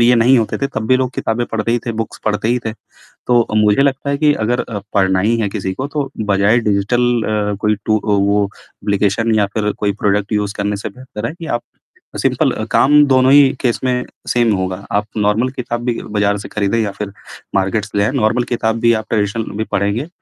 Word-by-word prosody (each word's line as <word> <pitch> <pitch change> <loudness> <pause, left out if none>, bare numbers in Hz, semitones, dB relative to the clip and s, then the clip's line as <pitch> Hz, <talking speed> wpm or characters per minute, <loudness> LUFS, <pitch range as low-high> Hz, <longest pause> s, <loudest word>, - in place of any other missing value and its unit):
नहीं 120 - +5
ये 125 - +6
नहीं 120 +3 +5
होते 110 - -1
थे 140 - 0
तब 110 0 -2
भी 130 - +4
लोग 130 -1 -1
किताबें 115 +2 -1
पढ़ते 110 +1 -1
ही 120 - +2
थे, 115 - -1
बुक्स 115 0 -5
पढ़ते 110 +1 0
ही 125 +1 +2
थे। 110 - -2 0.6
तो, 120 -2 +3
मुझे 105 +3 +4
लगता 140 0 0
है 140 - 0
कि 150 0 +3
अगर 120 +3 0
अ, 105 -3 -5
पढ़ना 95 -2 +3
ही 110 +5 +2
है 110 - +1
किसी 95 -1 -3
को, 130 +7 -4
तो 145 -2 -3 0.2
बजाय 100 +4 +3
डिजिटल 105 +4 +1 0.2
अ, 105 -1 -1
कोई 105 -1 +2
टू 110 0 +3
अ, - - -17
वो 100 +1 +2
एप्लीकेशन 105 +2 -1
या 105 -2 +3
फिर 105 -1 0
कोई 105 -1 +1
प्रोडक्ट 105 +1 +1
यूज़ 105 -1 0
करने 100 0 -1
से 105 - -5
बेहतर 125 -1 -7
है 150 - -6
कि, 170 -1 -9
आप 120 -5 -2 0.6
सिंपल - - +2
अ, - - -4
काम 150 +2 +5
दोनों 130 0 +4
ही 140 -1 +7
केस 120 -3 +1
में 125 -1 0 0.2
सेम 120 -3 +2
होगा। 95 +1 -3
आप 105 +1 +1
नॉर्मल 105 +5 +1
किताब 120 -1 -3
भी 120 -2 -1 0.2
बाज़ार 100 0 +2
से 100 - -8
खरीदें 105 +2 0
या 105 -3 0
फिर 100 -2 -4 0.4
मार्केट्स 100 +2 0
ले 100 - +3
आएँ, 110 - +1
नॉर्मल 120 -1 +1
किताब 110 -1 0
भी 115 0 +4
आप - - -18
ट्रेडिशनल 110 +1 0
भी 110 - 0
पढ़ेंगे, 100 +8 0
110 Hz, 225 wpm, -17 LUFS, 105-125 Hz, 0.6 s, ही